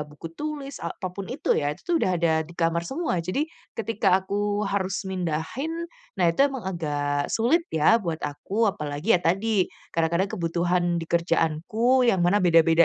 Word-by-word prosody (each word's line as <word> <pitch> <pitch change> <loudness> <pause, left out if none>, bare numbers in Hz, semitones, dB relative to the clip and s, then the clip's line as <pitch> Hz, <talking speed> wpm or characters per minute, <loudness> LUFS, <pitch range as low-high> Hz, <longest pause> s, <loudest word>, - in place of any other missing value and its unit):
buku 150 +2 -10
tulis 290 -2 -5
apa 170 +2 -5
pun 200 - -5
itu - - -6
ya, 145 0 0
itu - - -13
tuh 345 - +2
udah 185 - +2
ada 170 -1 +3 0.2
di - - -11
kamar 165 +1 +2
semua. 275 - -2
Jadi 280 - -1 0.3
ketika 225 -1 0
aku 205 +2 -1
harus 195 0 -1
mindahin, 185 - -2 0.5
nah 180 - +4
itu 165 - -3
emang 265 -7 -6
agak 145 -4 -1
sulit 255 +10 +3
ya 160 +9 +5
buat 165 -2 -2
aku. 145 +6 -6 0.2
Apalagi 150 +5 0
ya - - -4
tadi 195 +6 +1 0.4
kadang-kadang 170 +4 +1
kebutuhan 175 +1 0 0.2
di - - -4
kerjaanku 175 +9 +2
yang 190 -5 +3
mana 200 +4 +4
beda-beda 165 0 +6
180 Hz, 170 wpm, -25 LUFS, 165-215 Hz, 0.5 s, beda-beda